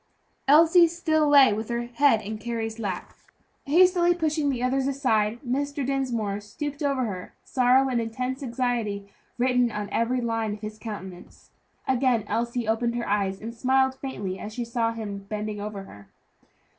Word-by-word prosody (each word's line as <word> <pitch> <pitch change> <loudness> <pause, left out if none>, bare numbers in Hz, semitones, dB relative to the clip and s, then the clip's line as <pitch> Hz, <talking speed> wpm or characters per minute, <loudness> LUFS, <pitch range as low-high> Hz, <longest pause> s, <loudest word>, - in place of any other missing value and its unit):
Elsie 330 +4 +7
still 315 -3 +1
lay 275 -6 +7
with 220 +2 -4
her 235 0 -1
head 240 -1 +2
in 215 +1 -5
Carry's 225 0 -4
lap. 195 -5 -4 0.5
Hastily 350 +3 +4
pushing 310 -3 0
the 250 -3 -2
others 265 +1 +1
aside, 235 -6 +1
Mr. 285 +2 -1
Dinsmore 240 -7 -1
stooped 290 +8 -6
over 275 -3 +1
her, 185 -4 -6
sorrow 255 +1 +3
and 245 -3 0
intense 250 +4 -3
anxiety 235 -5 -2 0.3
written 250 -1 +2
in 210 -2 -5
every 240 +2 +1
line 225 -3 -1
of 210 - -15
his 215 0 -7
countenance. 190 -5 -9 0.4
Again 255 -3 +2
Elsie 235 +2 -2
opened 235 +2 0
her 240 - -3
eyes, 200 -1 0
and 230 +1 -5
smiled 265 +2 +2
faintly 205 -9 -5
as 215 +1 -7
she 240 - -3
saw 230 -1 0
him 205 -3 -6
bending 210 -1 -4
over 205 -1 -5
her. 100 - -14
235 Hz, 160 wpm, -26 LUFS, 215-270 Hz, 0.5 s, Elsie